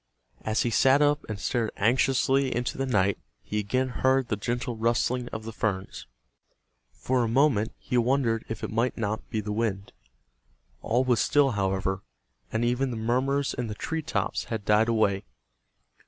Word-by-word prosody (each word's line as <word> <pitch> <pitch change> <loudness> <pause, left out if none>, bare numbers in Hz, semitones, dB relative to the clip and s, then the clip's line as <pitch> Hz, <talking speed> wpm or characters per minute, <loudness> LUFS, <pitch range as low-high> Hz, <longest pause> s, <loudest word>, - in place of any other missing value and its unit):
As 110 +1 0
he 120 - 0
sat 135 +3 +5
up 145 +1 +2
and 105 -2 -4
stared 115 +1 0
anxiously 130 +3 +2
into 120 0 -2
the 135 - -2
night 100 -5 +2 0.2
he 105 - -2
again 130 +6 0
heard 130 0 +1
the 105 - +1
gentle 120 +3 -3
rustling 120 +2 0
of 110 -2 -6
the 115 0 -7
ferns. 100 -4 -3 0.8
For 130 -1 0
a - - 0
moment 120 -3 +2
he 125 - -1
wondered 120 -2 +1
if 115 - -5
it - - -3
might 115 +3 0
not 110 -1 -3
be 110 - -2
the 105 0 -5
wind. 105 -3 -2 0.9
All 120 +3 +1
was 125 -3 +2
still, 145 -2 +3
however, 95 -2 -1 0.5
and 115 +1 0
even 125 +3 +1
the 120 - -4
murmurs 130 +5 0
in 125 -1 -3
the 105 - -5
tree 160 +8 -3
tops 160 +1 -2
had 110 -3 -4
died 105 +2 +4
away. 100 -3 +2
115 Hz, 170 wpm, -27 LUFS, 110-130 Hz, 0.9 s, sat